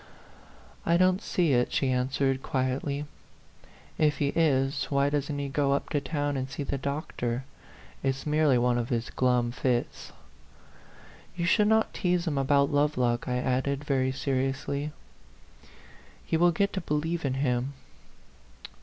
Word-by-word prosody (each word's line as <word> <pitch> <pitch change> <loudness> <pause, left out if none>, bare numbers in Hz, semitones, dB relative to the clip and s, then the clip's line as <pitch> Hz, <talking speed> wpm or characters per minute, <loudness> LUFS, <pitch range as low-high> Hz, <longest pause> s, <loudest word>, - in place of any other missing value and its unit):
" - - -24 0.3
I 170 +1 +3
don't 185 +2 +3
see 170 -9 +1
it," 125 0 +2
she 135 -2 +1
answered, 130 +1 0
quietly. 135 +3 -2 0.5
" - - -26
If 150 - -1
he 140 - +1
is, 140 -4 +1
why 140 0 +1
doesn't 145 0 -1
he 140 0 -2
go 140 0 +1
up 140 - -2
to 145 - 0
town 145 0 -2
and 130 0 -3
see 145 - -4
the 140 0 -3
doctor? 135 -3 -3 0.6
It's 135 -1 -1
merely 150 -3 +3
one 120 0 +2
of 120 - -3
his 120 -1 -2
glum 125 -2 +1
fits." 125 0 -2 1.2
"You 170 -1 -1
should 210 +4 +4
not 220 +1 +2
tease 180 -2 0
him 145 -5 0
about 140 +1 +3
Love 145 0 +2
lock," 120 -1 0
I 125 -1 0
added, 130 +2 -1
very 130 -2 +1
seriously. 135 +2 -2 0.7
" - - -23
He - - -1
will 175 +2 +4
get 200 +4 0
to 190 - -2
believe 160 +2 -2
in 135 -2 -1
him." 130 0 0
140 Hz, 160 wpm, -28 LUFS, 130-150 Hz, 1.2 s, should